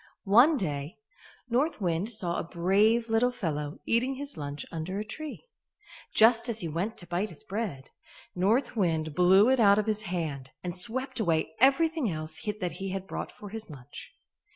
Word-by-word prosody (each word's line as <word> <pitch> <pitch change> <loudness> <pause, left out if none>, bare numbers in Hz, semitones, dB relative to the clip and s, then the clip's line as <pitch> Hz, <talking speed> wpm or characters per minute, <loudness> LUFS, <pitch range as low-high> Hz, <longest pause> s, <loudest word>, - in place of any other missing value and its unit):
One 245 +10 +6
day, 150 - -3 0.5
North 260 +6 0
Wind 175 +1 -1
saw 185 -7 -2
a - - -2
brave 200 +7 +2
little 225 +2 +3
fellow 150 -10 -3
eating 250 +4 +1
his 285 +1 -6
lunch 145 -2 -5
under 165 +4 -4
a 210 - -3
tree. 310 - -7 0.7
Just 230 +2 +5
as 225 -1 +1
he 170 - -2
went 175 +8 -3
to 175 - -8
bite 180 +5 -1
his 170 - -10
bread, 195 -10 -5 0.4
North 220 +9 +1
Wind 160 -6 0
blew 185 +6 +5
it 265 -1 +3
out 200 -2 +6
of 210 - +1
his 215 -1 0
hand 150 -7 -3
and 175 -1 -4
swept 240 +8 -1
away 160 -6 0
everything 285 +1 +3
else 155 -1 -4 0.2
that 180 -3 -2
he 195 0 -4
had 190 0 -4
brought - - -5
for 205 - -11
his 220 -1 -8
lunch. 140 -2 -11
195 Hz, 175 wpm, -28 LUFS, 165-230 Hz, 0.7 s, One